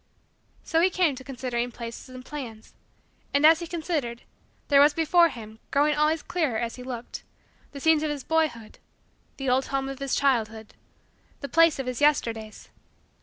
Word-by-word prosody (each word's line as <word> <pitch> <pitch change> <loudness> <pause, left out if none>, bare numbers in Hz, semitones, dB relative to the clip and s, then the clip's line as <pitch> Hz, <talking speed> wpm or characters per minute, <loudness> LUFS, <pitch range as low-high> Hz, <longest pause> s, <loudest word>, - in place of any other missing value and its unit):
So 325 -1 +1
he 365 - +4
came 360 -5 +2
to 260 - -10
considering 245 -2 -3
places 235 +2 -8
and 255 0 -10
plans. 235 -7 -8 0.6
And, 285 +2 +4
as 320 +1 +7
he 340 - -6
considered, 310 -8 -3 0.4
there 280 -1 +6
was 295 +1 +5
before 335 +1 +4
him, 220 -4 -10
growing 295 +2 +2
always 305 +1 +1
clearer 310 -11 -1
as 235 0 -3
he 250 - -10
looked, 250 -2 -7 0.5
the 280 - -8
scenes 320 +1 +3
of 310 - -1
his 290 -3 -4
boyhood 310 -9 -1 0.6
the 270 - -5
old 255 +1 +2
home 270 0 -2
of 270 0 -6
his 275 -1 -1
childhood 225 -5 0 0.7
the 280 - -4
place 330 -1 +4
of 270 - -4
his 250 0 -4
Yesterdays. 230 -7 0
275 Hz, 170 wpm, -26 LUFS, 240-310 Hz, 0.7 s, as